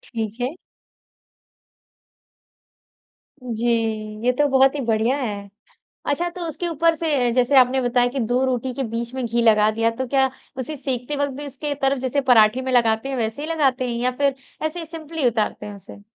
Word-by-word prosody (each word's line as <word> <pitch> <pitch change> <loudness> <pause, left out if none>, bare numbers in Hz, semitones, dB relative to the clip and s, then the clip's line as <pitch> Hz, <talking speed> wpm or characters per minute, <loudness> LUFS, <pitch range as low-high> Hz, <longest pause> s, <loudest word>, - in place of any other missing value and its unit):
ठीक 220 0 -3
है। 250 - 0 2.9
जी, 235 -1 -2 0.6
ये 250 - +5
तो 290 +3 +2
बहुत 270 +1 +4
ही 290 - -2
बढ़िया 230 +4 +1
है। 205 -6 -4 0.6
अच्छा, 345 +5 0
तो 355 0 -9
उसके 345 +3 -4
ऊपर 330 0 +2
से 320 -2 -1 0.2
अ, - - 0
जैसे 255 +2 +3
आपने 255 +1 +3
बताया 245 0 +2
कि 275 - -3
2 245 +3 +1
रोटी 255 0 -1
के 270 - -3
बीच 230 +1 -4
में 260 - -2
घी 235 +1 0
लगा 215 -2 +5
दिया 225 +1 +1
तो 260 - -1
क्या 265 0 +2 0.3
उसे 260 +4 -4
सेंकते 265 0 -3
वक़्त 285 -1 -1
भी 290 - -6
उसके 285 +2 -4
तरफ, 275 -1 +1
जैसे 265 +2 0
पराठे 245 -1 +5
में 260 0 -3
लगाते 230 +1 +2
हैं, 270 - -2
वैसे 225 +4 -2
ही - - -4
लगाते 265 -5 +1
हैं 235 - -2
या 250 +1 +1
फिर 280 -1 +2 0.3
ऐसे 330 +3 -3
ही 330 - -6
सिंपली 320 -3 -3
उतारते 220 -2 -1
हैं 205 - -7
उसे? 200 +1 -13
255 Hz, 195 wpm, -22 LUFS, 235-285 Hz, 2.9 s, ये